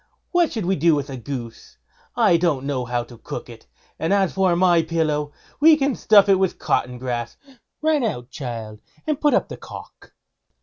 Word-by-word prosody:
What 350 -3 +2
should 220 -6 -3
we 190 +2 +1
do 165 0 +3
with 140 -1 -3
a - - -5
goose? 120 -2 -8 0.4
I 170 - +4
don't 165 -6 +1
know 135 -3 -2
how 120 0 -1
to 120 -1 -15
cook - - -7
it; - - -13 0.3
and 160 - -1
as 195 -2 +2
for 190 -2 +2
my 175 -1 +4
pillow, 155 -3 -1 0.3
I 315 +1 +8
can 280 -2 0
stuff 210 -3 +5
it 195 -2 +4
with 190 -2 0
cotton 125 0 -1
grass. 120 -2 -4 0.5
Run 310 -3 +2
out, 125 - -3
child, 115 -5 -7 0.2
and 305 -2 -2
put 295 - +4
up - - +1
the - - -8
cock." - - -12
160 Hz, 190 wpm, -22 LUFS, 125-195 Hz, 0.5 s, I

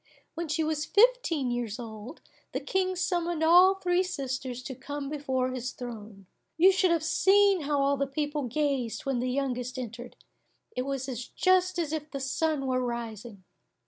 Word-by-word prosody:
When 335 0 -4
she 315 +2 0
was 310 -1 -1
fifteen 405 - +3
years 240 -3 -3
old, 225 +3 -9 0.3
the - - -1
King 370 -1 -1
summoned 345 -2 -1
all 360 +4 +7
three 360 -1 +1
sisters 260 -7 -4
to 260 - -5
come 280 +2 -6
before 265 -3 -1
his 255 0 -4
throne. 215 -5 -9 0.3
You 365 +4 +7
should 375 -1 +2
have 335 -2 +1
seen 390 +2 +4
how 290 0 +1
all 280 0 +2
the 275 0 0
people 290 0 -2
gazed 260 -2 -1
when 270 -3 0
the 250 +1 -1
youngest 255 -1 -2
entered, 245 0 -7 0.6
it 250 +1 -2
was 275 -1 -2 0.3
just 370 0 +3
as 320 -3 -1
if 305 -1 -4
the 275 - -5
sun 280 +2 -1
were 255 -1 0
rising! 230 -4 -5
280 Hz, 170 wpm, -28 LUFS, 250-335 Hz, 0.6 s, all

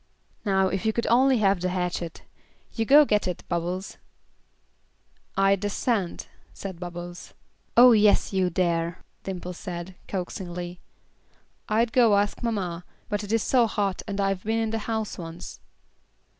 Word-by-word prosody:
"Now 190 -2 +2
if 190 -1 -2
you 220 -1 +1
could 235 - -1
only 260 +2 +5
have 195 -4 +2
the 185 - 0
hatchet. 180 -2 -3 0.5
You 225 - -1
go 290 +5 +7
get 210 -6 +1
it, 180 - -4
Bubbles." 175 +3 -3 1.4
"I 195 0 +5
dassent," 205 0 -2 0.3
said 190 -4 -7
Bubbles. 175 0 -8 0.4
"Oh 245 +1 +9
yes, 210 -2 +4
you 185 -1 +2
dare," 170 -1 -1 0.2
Dimple 180 -1 -5
said, 175 0 -6
coaxingly. 180 -1 -5 0.9
"I'd 225 +2 +2
go 230 -5 +5
ask 205 0 0
mamma, 185 -7 -2 0.3
but 205 -1 -1
it 205 - -6
is 225 -1 +2
so 245 -3 +3
hot 200 -3 -1
and 200 0 -4
I've 195 -2 0
been 220 +1 0
in 225 -1 0
the 225 - -1
house 220 -3 -2
once." 165 0 -8
195 Hz, 145 wpm, -26 LUFS, 180-220 Hz, 1.4 s, Oh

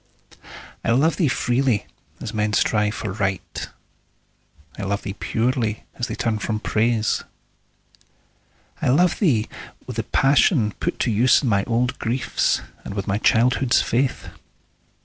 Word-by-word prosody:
I - - -1
love 150 +7 +2
thee 170 - +2
freely, 125 -3 +1 0.3
as 110 - -6
men 105 -1 0
strive 105 0 +2
for 110 - -4
Right; 95 -2 -3 1.1
I - - -7
love 100 +1 -2
thee 100 - -4
purely, 115 0 -1
as 120 - -3
they 110 - -4
turn 110 -2 -1
from 110 0 -2
Praise. 110 0 +1 1.6
I - - +1
love 170 +7 +3
thee 125 - +2 0.4
with 125 -3 -7
the 115 - 0
passion 135 - +3
put - - -2
to 120 - +1
use 120 +7 +4
In 130 - +1
my 100 -2 +2
old 120 +2 0
griefs, 120 +3 0 0.2
and 100 - -7
with 100 -1 -3
my 100 +1 -1
childhood's 120 +3 +3
faith. 130 +3 -1
115 Hz, 145 wpm, -22 LUFS, 105-125 Hz, 1.6 s, use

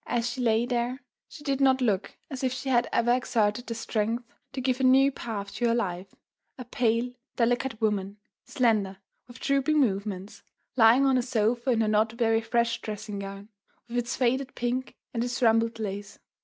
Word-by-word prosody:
As 240 -1 0
she 255 +1 -4
lay 230 -1 +2
there, 245 +1 -1 0.3
she 295 - -12
did 275 -2 -1
not 265 -1 +4
look 210 -6 -1
as 270 -1 -5
if 260 - +1
she 255 +2 -4
had 240 -1 +2
ever 240 +1 +3
exerted 240 -2 0
the 230 - -3
strength 225 +1 -1 0.3
to 265 - -5
give 255 0 0
a - - -1
new 265 +2 +6
path 205 -6 -6
to 240 - 0
her 230 - +2
life: 190 -4 -3 0.4
a 255 - -7
pale, 235 0 0 0.2
delicate 240 -1 0
woman, 205 -2 -1 0.3
slender, 215 -8 +1 0.3
with 245 0 -13
drooping 275 +2 +2
movements, 200 -5 -1 0.3
lying 240 +3 +6
on 265 -2 +4
a - - +2
sofa 240 +1 0
in 230 -3 +3
her 220 - +1
not 215 +1 +2
very 225 -1 +2
fresh 235 0 0
dressing 210 -1 -5
gown, 195 +1 -8 0.4
with 235 - -7
its 240 0 -1
faded 260 +2 0
pink 245 +2 -2 0.2
and 230 -1 -1
its 245 0 -3
rumpled 230 -1 +3
lace. 205 -2 -5
235 Hz, 185 wpm, -27 LUFS, 215-255 Hz, 0.4 s, new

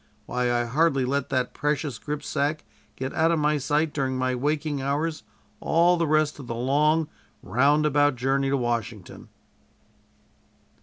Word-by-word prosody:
Why, 125 0 -1
I 120 0 +1
hardly 140 +1 +1
let 140 +1 -1
that 130 -2 -1
precious 145 -4 -2
gripsack 150 0 -2 0.3
get 130 +2 -5
out 160 +1 +2
of 170 - +2
my 150 0 +1
sight 150 +3 0
during 130 -2 -1
my 130 0 0
waking 145 +2 -1
hours 150 +4 -2 0.4
all 170 +2 +3
the 165 -1 0
rest 155 0 +1
of 135 - -9
the 115 - -4
long 150 +6 +2 0.4
roundabout 145 +5 +2
journey 135 +2 0
to 140 - +1
Washington." 115 -5 -4
140 Hz, 145 wpm, -25 LUFS, 130-150 Hz, 0.4 s, all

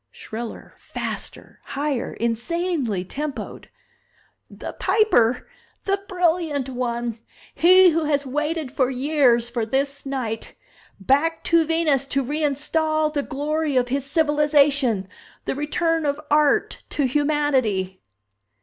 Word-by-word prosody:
Shriller, 225 +1 -8
faster, - - -7
higher, 280 -3 -3
insanely 235 - -1
tempoed. 290 +7 -6 0.8
"The - - -8
Piper 250 - +2 0.4
The 395 0 -1
Brilliant 335 -7 0
One 240 -2 -3 0.3
He 370 +1 +6
who 325 0 0
has 285 -1 0
waited 300 +1 -2
for 260 -2 +1
years 260 -3 +2
for 235 -1 -1
this 275 +5 -1
night. 240 -5 -4 0.4
Back 290 - +1
to 335 -1 +3
Venus 310 -5 +1
to 275 -1 0
reinstall 305 +2 0
the 290 - 0
glory 295 +1 -1
of 245 -1 +1
his 275 +1 -1
civilization! 285 - +2 0.4
The - - -1
return 320 +2 0
of 285 +1 -1
Art 295 -1 +2
to 285 - 0
humanity!" 260 -10 0
285 Hz, 115 wpm, -23 LUFS, 250-310 Hz, 0.8 s, He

